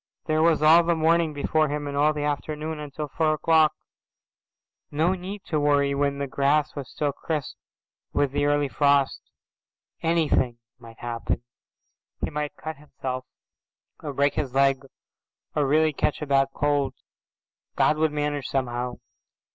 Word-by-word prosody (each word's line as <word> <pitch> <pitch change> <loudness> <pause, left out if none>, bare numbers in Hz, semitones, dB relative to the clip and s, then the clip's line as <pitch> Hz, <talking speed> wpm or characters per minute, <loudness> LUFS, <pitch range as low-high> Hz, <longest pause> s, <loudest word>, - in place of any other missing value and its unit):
There 155 0 +1
was 160 -2 +3
all 160 +2 +8
the 170 0 +1
morning 165 0 +2
before 155 +2 +1
him 145 0 -3
and 140 - -4
all 150 +2 +4
the 150 -1 -3
afternoon 150 +1 -3
until 150 0 -5
four 155 +2 +1
o'clock. 160 0 +4 1.2
No 160 +5 +1
need 190 +2 -6
to 155 - -1
worry 145 -1 +2
when 140 0 0
the 140 - -2
grass 140 +2 +1
was 140 -3 -6
still 145 -1 -1
crisp 150 0 -4 0.6
with 145 -2 +1
the 145 - 0
early 145 0 +2
frost. 140 0 +2 0.8
Anything 155 -7 +1 0.2
might 115 -1 -13
happen. 120 0 -3 0.8
He - - -1
might 150 0 -4
cut 155 -1 -6
himself 130 -3 -6 0.7
or 150 - -4
break 140 +1 +2
his 135 -3 -3
leg 135 -1 +3 0.7
or 145 -2 +2
really 155 +2 +3
catch 145 - -1
a - - -2
bad 135 -1 +3
cold. 145 -1 0 0.8
God 155 - +3
would 155 0 +2
manage 145 -2 -2
somehow. 125 -2 -2
145 Hz, 150 wpm, -25 LUFS, 140-155 Hz, 1.2 s, all